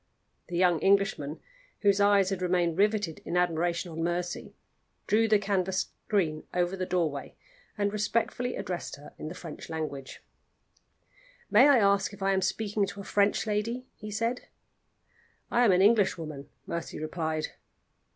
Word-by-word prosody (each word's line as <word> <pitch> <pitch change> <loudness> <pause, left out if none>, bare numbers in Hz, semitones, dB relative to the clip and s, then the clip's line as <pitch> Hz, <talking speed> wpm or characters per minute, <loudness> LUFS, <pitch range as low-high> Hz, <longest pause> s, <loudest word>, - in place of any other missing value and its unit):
The 175 - -3
young 175 -2 +4
Englishman, 195 -7 +1 0.4
whose 200 -1 +4
eyes 200 -1 +4
had 190 -2 -2
remained 175 -2 +1
riveted 205 -3 +1
in 175 - -2
admiration 175 0 0
on 165 +1 -5
Mercy, 175 +1 -3 0.5
drew 220 +2 +3
the 215 -1 +5
canvas 190 -2 0 0.2
screen 160 -7 0
over 180 +1 +1
the 185 -1 -3
doorway 165 -6 -1 0.4
and 205 0 0
respectfully 230 +4 -1
addressed 175 -2 -4
her 145 +1 -13
in - - -5
the 165 - -6
French 165 -3 -9
language. 150 -4 -5 1.3
"May 245 +7 +7
I 280 - +7
ask 200 -2 +3
if 200 - -7
I 195 0 +3
am 190 - +1
speaking 205 0 0
to 200 0 -7
a - - -9
French 205 +1 +2
lady?" 225 +4 -2
he 215 - -8
said. 230 +4 -2 1.0
"I 240 - +4
am 210 - +6
an 185 +1 +4
Englishwoman," 165 -10 +2 0.2
Mercy 170 -2 -5
replied. 155 0 -2
190 Hz, 150 wpm, -29 LUFS, 170-210 Hz, 1.3 s, May